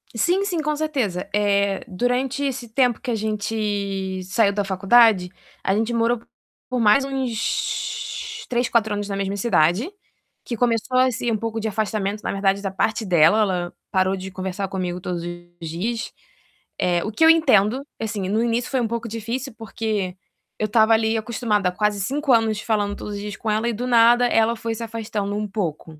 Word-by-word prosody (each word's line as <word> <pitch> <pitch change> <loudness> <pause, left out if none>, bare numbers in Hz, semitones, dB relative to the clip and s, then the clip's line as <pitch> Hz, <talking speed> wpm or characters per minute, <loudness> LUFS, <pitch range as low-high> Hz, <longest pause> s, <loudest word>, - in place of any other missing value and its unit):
Sim, 360 - +2
sim, 350 -5 -1
com 300 0 -1
certeza. 265 - -2
Eh, 200 +1 +1
durante 250 +7 -1
esse 255 -3 -3
tempo 245 0 +1
que 260 - -5
a 230 - +1
gente 205 -3 -2
saiu 200 +2 +2
da 205 0 0
faculdade, 195 0 +4 0.3
a 195 - +1
gente 225 +2 0
morou 230 0 +1 0.5
por 255 -1 -1
mais 220 +5 +5
uns 270 - -3
3, 245 0 0
4 220 -3 +2
anos 205 0 -3
na 195 - -2
mesma 195 0 -2
cidade, 200 - +2 0.6
que 235 - -3
começou 240 +2 +1
assim 245 -2 +1
um 215 - +1
pouco 225 +1 -3
de 220 - -2
afastamento 210 -1 -2
na - - -2
verdade 195 0 +1
da 200 - -2
parte 215 +4 -1
dela, 175 +3 +5
ela 180 -4 -1 0.2
parou 190 0 +2
de 190 0 -6
conversar 190 +1 -4
comigo 180 -2 -3
todos 175 -2 -4
os 175 -1 -8
dias. 220 +9 -3 0.7
Eh, 175 -1 +1
o 215 - -3
que 320 +9 +3
eu 320 - +8
entendo, 260 -7 +4 0.2
assim, 205 -4 -3
no 220 +3 +1
início 235 +1 0
foi 260 -2 +1
um 230 - 0
pouco 230 0 -3
difícil, 230 +4 -4
porque 215 -4 -3 0.4
eu 215 - 0
estava 220 +1 +4
ali 220 0 +2
acostumada 220 -4 0
há - - -4
quase 210 +1 0
5 280 +6 0
anos 220 -2 +2
falando 205 -2 0
todos 205 - -6
os - - -5
dias 205 -1 -5
com 220 - -3
ela 220 +2 0
e 235 - -1
do 245 +4 -3
nada 240 +1 +5
ela 225 0 +2
foi 230 0 -3
se 230 - -5
afastando 215 -3 -3
um 210 0 -2
pouco. 165 -6 -4
215 Hz, 190 wpm, -22 LUFS, 195-235 Hz, 0.7 s, eu